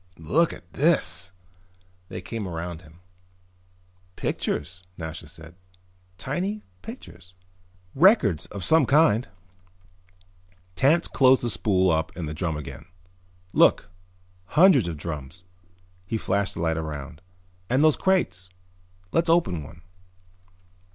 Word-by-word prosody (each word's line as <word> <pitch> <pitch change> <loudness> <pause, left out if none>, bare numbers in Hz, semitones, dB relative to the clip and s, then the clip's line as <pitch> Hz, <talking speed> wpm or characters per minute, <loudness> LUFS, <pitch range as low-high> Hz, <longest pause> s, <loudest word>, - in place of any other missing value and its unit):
"Look 155 - +1
at 85 - -13
this!" 95 - +2 0.8
They - - -6
came 105 +2 -5
around 85 -1 -5
him. 80 +1 -19 1.1
"Pictures," 85 +5 -3 0.2
Nasha 80 -1 -7
said. 80 +1 -12 0.6
"Tiny 185 - -3 0.2
pictures." 90 0 -12 0.6
"Records 135 - +4
of 100 -3 -7
some 160 - +4
kind." 140 -5 +4 1.5
Tance 155 - +3
closed 130 -1 +4
the 120 - 0
spool 95 -4 +2
up 80 +1 0
in 85 - -3
the 75 - -5
drum 80 -1 -2
again. 75 +2 -9 0.7
"Look, 85 - +4 0.7
hundreds 165 - +6
of 85 -2 -4
drums." 75 +1 -7 0.6
He 115 - -1
flashed 100 -1 -1
the - - -4
light 80 -1 0
around. 75 -1 -6 0.5
"And 130 +4 +3
those 155 -2 +5
crates. 95 - 0 0.6
Let's 165 0 +1
open 165 - +2
one." 80 +3 -13
90 Hz, 115 wpm, -25 LUFS, 80-135 Hz, 1.5 s, hundreds